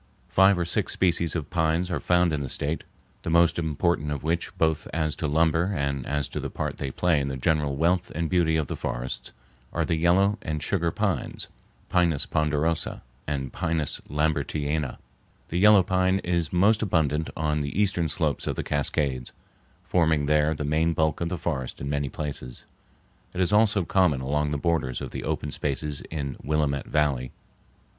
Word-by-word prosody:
Five 95 Hz, 0 st, +5 dB
or 85 Hz, -, 0 dB
six 85 Hz, -, -1 dB
species 85 Hz, -2 st, +1 dB
of 80 Hz, -4 st, -4 dB
pines 85 Hz, +1 st, +1 dB
are -, -, 0 dB
found 90 Hz, -2 st, +2 dB
in 75 Hz, -, 0 dB
the 70 Hz, -2 st, -4 dB
State, 75 Hz, +6 st, -2 dB, 0.4 s
the -, -, -4 dB
most 85 Hz, +1 st, +4 dB
important 80 Hz, -1 st, 0 dB
of 75 Hz, 0 st, -3 dB
which, 85 Hz, +2 st, -1 dB
both 80 Hz, -2 st, +1 dB
as 80 Hz, -2 st, -1 dB
to 80 Hz, -, -1 dB
lumber 80 Hz, +5 st, +2 dB
and 70 Hz, -2 st, -2 dB
as 75 Hz, -1 st, -1 dB
to -, -, -4 dB
the -, -, -4 dB
part -, -, -4 dB
they 70 Hz, -, -2 dB
play 85 Hz, +3 st, +2 dB
in 70 Hz, -, -2 dB
the 65 Hz, -1 st, -3 dB
general 75 Hz, 0 st, +1 dB
wealth 85 Hz, +4 st, +1 dB
and 85 Hz, +1 st, 0 dB
beauty 85 Hz, -2 st, +2 dB
of 80 Hz, -, 0 dB
the -, -, -4 dB
forests, -, -, -4 dB, 0.4 s
are -, -, 0 dB
the -, -, 0 dB
yellow 95 Hz, +6 st, +3 dB
and 75 Hz, -1 st, -3 dB
sugar 85 Hz, -3 st, +1 dB
pines -, -, -2 dB, 0.4 s
(Pinus 85 Hz, -5 st, +2 dB
ponderosa 75 Hz, +1 st, 0 dB, 0.2 s
and 70 Hz, -3 st, -3 dB
P. -, -, -12 dB, 0.5 s
Lambertiana). 75 Hz, -1 st, -1 dB, 0.5 s
The 85 Hz, -, -1 dB
yellow 105 Hz, -1 st, +7 dB
pine 95 Hz, +1 st, +2 dB
is 85 Hz, -3 st, 0 dB
most 100 Hz, +5 st, +4 dB
abundant 80 Hz, -6 st, +1 dB
on 75 Hz, -1 st, 0 dB
the 70 Hz, +7 st, -3 dB
eastern 95 Hz, -5 st, +1 dB
slopes -, -, -1 dB
of -, -, -1 dB
the -, -, -3 dB
Cascades, 70 Hz, -3 st, -1 dB, 0.5 s
forming 80 Hz, -4 st, +2 dB
there 75 Hz, +1 st, +3 dB
the 75 Hz, -, -3 dB
main 80 Hz, +3 st, +2 dB
bulk 80 Hz, -1 st, 0 dB
of 85 Hz, -, 0 dB
the 90 Hz, -, -2 dB
forest 65 Hz, -5 st, -3 dB
in 70 Hz, +1 st, -3 dB
many 70 Hz, -1 st, -1 dB
places. 70 Hz, -4 st, -6 dB, 0.7 s
It -, -, -3 dB
is 95 Hz, +2 st, +2 dB
also 105 Hz, -3 st, +4 dB
common 90 Hz, -8 st, +3 dB
along 75 Hz, +3 st, 0 dB
the 75 Hz, -, -1 dB
borders 70 Hz, -6 st, 0 dB
of -, -, -6 dB
the -, -, -5 dB
open 75 Hz, -, -2 dB
spaces 75 Hz, +1 st, -2 dB
in 70 Hz, -4 st, -4 dB
Willamette 75 Hz, -2 st, 0 dB
Valley. 70 Hz, -4 st, 0 dB
80 Hz, 180 wpm, -26 LUFS, 75-85 Hz, 0.7 s, yellow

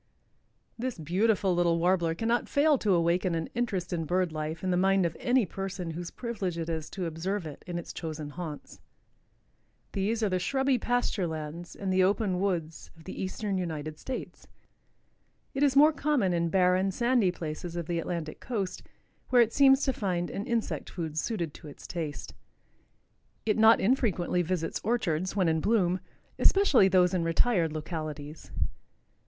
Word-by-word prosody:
_) -, -, -44 dB, 0.8 s
This 255 Hz, 0 st, -3 dB
beautiful 190 Hz, +4 st, +1 dB
little 175 Hz, -1 st, +2 dB
Warbler 170 Hz, -1 st, +2 dB
cannot 230 Hz, +5 st, 0 dB
fail 290 Hz, -1 st, +3 dB
to 200 Hz, -4 st, +2 dB
awaken 170 Hz, +1 st, +1 dB
an 160 Hz, -1 st, -3 dB
interest 200 Hz, -7 st, -2 dB
in 165 Hz, -2 st, -1 dB
bird 180 Hz, +1 st, +1 dB
life 155 Hz, +2 st, -4 dB
in 185 Hz, -, 0 dB
the -, -, +2 dB
mind 190 Hz, 0 st, +3 dB
of 165 Hz, -, -2 dB
any 250 Hz, -2 st, +3 dB
person 190 Hz, -2 st, -5 dB
whose 170 Hz, +1 st, -5 dB
privilege 205 Hz, -8 st, -4 dB
it 165 Hz, 0 st, -3 dB
is 160 Hz, -2 st, -3 dB
to 185 Hz, -, -4 dB
observe 170 Hz, +4 st, -3 dB
it 150 Hz, -2 st, -9 dB
in 175 Hz, -1 st, -3 dB
its 170 Hz, -, -6 dB
chosen 155 Hz, -3 st, -5 dB
haunts. 155 Hz, -2 st, -7 dB, 1.1 s
These 215 Hz, +4 st, -1 dB
are 210 Hz, -, +2 dB
the 185 Hz, -1 st, 0 dB
shrubby 265 Hz, +6 st, +1 dB
pasture 240 Hz, -6 st, 0 dB
lands 160 Hz, +2 st, -6 dB
and 195 Hz, -2 st, -2 dB
the 185 Hz, 0 st, +4 dB
open 195 Hz, -1 st, +1 dB
woods 170 Hz, -5 st, -2 dB
of 160 Hz, -, -15 dB
the 185 Hz, -, -7 dB
eastern 195 Hz, +1 st, -2 dB
United 155 Hz, -3 st, -4 dB
States. 260 Hz, -, -6 dB, 1.1 s
It 270 Hz, -, -2 dB
is 280 Hz, -2 st, +4 dB
more 300 Hz, +3 st, +7 dB
common 280 Hz, -11 st, +1 dB
in 170 Hz, -1 st, +1 dB
barren, 185 Hz, +1 st, +3 dB
sandy 235 Hz, -1 st, +2 dB
places 170 Hz, 0 st, -5 dB
of 170 Hz, -1 st, -3 dB
the 170 Hz, +1 st, -1 dB
Atlantic 165 Hz, -2 st, -4 dB
coast, 200 Hz, -7 st, -3 dB, 0.5 s
where 245 Hz, -2 st, +6 dB
it 230 Hz, -, -4 dB
seems 270 Hz, 0 st, +6 dB
to 265 Hz, -, +1 dB
find 180 Hz, -6 st, -2 dB
an 205 Hz, +5 st, -4 dB
insect 235 Hz, -3 st, -2 dB
food 160 Hz, -4 st, -5 dB
suited 170 Hz, -3 st, -2 dB
to 160 Hz, -, -12 dB
its 145 Hz, -, -12 dB
taste. 160 Hz, -4 st, -5 dB, 1.1 s
It 220 Hz, 0 st, +1 dB
not 220 Hz, +1 st, +7 dB
infrequently 195 Hz, -7 st, +1 dB
visits 175 Hz, -1 st, -2 dB
orchards, 185 Hz, -6 st, 0 dB
when 190 Hz, -4 st, +2 dB
in 160 Hz, -1 st, +1 dB
bloom, 185 Hz, -4 st, +2 dB, 0.4 s
especially 345 Hz, -, +5 dB
those 180 Hz, -1 st, +4 dB
in 180 Hz, -2 st, +1 dB
retired 165 Hz, 0 st, +2 dB
localities. 155 Hz, -1 st, -6 dB
180 Hz, 170 wpm, -29 LUFS, 165-220 Hz, 1.1 s, more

